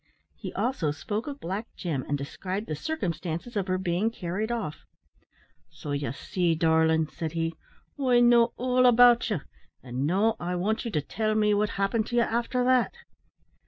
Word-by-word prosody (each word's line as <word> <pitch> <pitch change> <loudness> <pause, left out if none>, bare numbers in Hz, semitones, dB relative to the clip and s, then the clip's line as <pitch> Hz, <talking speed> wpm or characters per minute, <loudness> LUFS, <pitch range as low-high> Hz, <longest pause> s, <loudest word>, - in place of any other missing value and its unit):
He - - -7
also 245 - 0
spoke 180 - -3
of 285 -1 -6
Black 195 +6 -4
Jim, 155 -8 -3
and 145 - 0
described 185 +8 -4
the 155 - -3
circumstances 175 - -4
of 200 -2 -1
her 185 0 +1
being 185 +3 0
carried 210 +1 -3
off. 220 -11 -4 0.9
"So 150 -2 -8
ye 140 -4 -2
see, 170 +5 -1
darlin'," 160 0 +3
said 160 +1 -5
he, 165 0 -1 0.5
"I 250 -2 +4
know 240 -1 +5
all 255 0 +3
about 245 0 +6
ye; 195 -9 -1 0.4
an' 130 +2 -2
now 205 +6 +2
I 175 +1 -2
want 210 +7 -1
ye - - -2
to 155 -8 0
tell 215 +8 -1
me 210 -1 +3
what 210 +1 +1
happened 210 +3 0
to 240 - -4
ye 240 - +5
after 240 +2 0
that." 255 -1 +3
195 Hz, 175 wpm, -27 LUFS, 160-235 Hz, 0.9 s, about